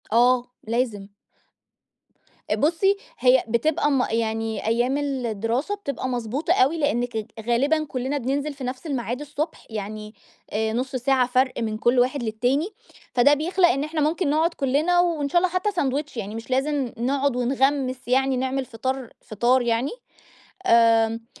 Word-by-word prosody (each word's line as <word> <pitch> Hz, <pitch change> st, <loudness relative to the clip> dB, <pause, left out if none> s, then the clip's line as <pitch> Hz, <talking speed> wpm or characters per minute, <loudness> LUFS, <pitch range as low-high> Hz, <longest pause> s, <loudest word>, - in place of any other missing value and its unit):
آه، 245 Hz, +2 st, +4 dB, 0.2 s
لازم. 225 Hz, -4 st, -1 dB, 1.5 s
بُصّي 350 Hz, +6 st, +2 dB, 0.2 s
هي 255 Hz, 0 st, +5 dB
بتبقى 290 Hz, +6 st, +1 dB
م 265 Hz, -3 st, +2 dB
يعني 225 Hz, -1 st, -2 dB
أيام 240 Hz, +4 st, +1 dB
الدراسة 255 Hz, -, -2 dB
بتبقى 280 Hz, -10 st, -4 dB
مضبوطة 250 Hz, +7 st, -1 dB
أوي 310 Hz, 0 st, +3 dB
لإنّك 245 Hz, -6 st, 0 dB
ج 215 Hz, -, -3 dB, 0.2 s
غالبًا 280 Hz, +6 st, +2 dB
كلّنا 265 Hz, +1 st, -3 dB
بننزل 280 Hz, +3 st, -2 dB
في 275 Hz, -1 st, -9 dB
نفْس 255 Hz, +4 st, -5 dB
الميعاد 250 Hz, -2 st, -3 dB
الصبح، 295 Hz, +2 st, -5 dB
يعني 215 Hz, 0 st, -6 dB, 0.4 s
آآ 220 Hz, +1 st, -1 dB
نُص 260 Hz, +3 st, -2 dB
ساعة 255 Hz, 0 st, +2 dB
فرْق 255 Hz, +1 st, +1 dB
من 215 Hz, -1 st, -2 dB
كلّ 240 Hz, +3 st, +2 dB
واحد 250 Hz, +2 st, +1 dB
للتاني، 245 Hz, -, 0 dB, 0.4 s
فده 255 Hz, +4 st, +5 dB
بيخلق 350 Hz, +5 st, +2 dB
إن 275 Hz, -4 st, +1 dB
إحنا 305 Hz, +1 st, -2 dB
ممكن 310 Hz, +2 st, +1 dB
نقعُد 320 Hz, +3 st, +2 dB
كلّنا 300 Hz, +6 st, +1 dB
وإن 330 Hz, -5 st, +1 dB
شاء 350 Hz, -, +2 dB
الله 370 Hz, -, +2 dB
حتّى 370 Hz, +3 st, +1 dB
ساندوتش، 290 Hz, -5 st, -2 dB
يعني 210 Hz, -1 st, -5 dB
مش 225 Hz, +2 st, -8 dB
لازم 270 Hz, -1 st, 0 dB
نقعُد 270 Hz, +2 st, 0 dB
ونغمّس 260 Hz, +1 st, 0 dB
يعني 265 Hz, +1 st, +2 dB
نعمل 265 Hz, +1 st, -1 dB
فطار 260 Hz, +1 st, -4 dB
فطار 240 Hz, +5 st, +2 dB
يعني، 240 Hz, +3 st, 0 dB, 0.8 s
آمم 230 Hz, -1 st, +4 dB
260 Hz, 150 wpm, -24 LUFS, 235-290 Hz, 1.5 s, هي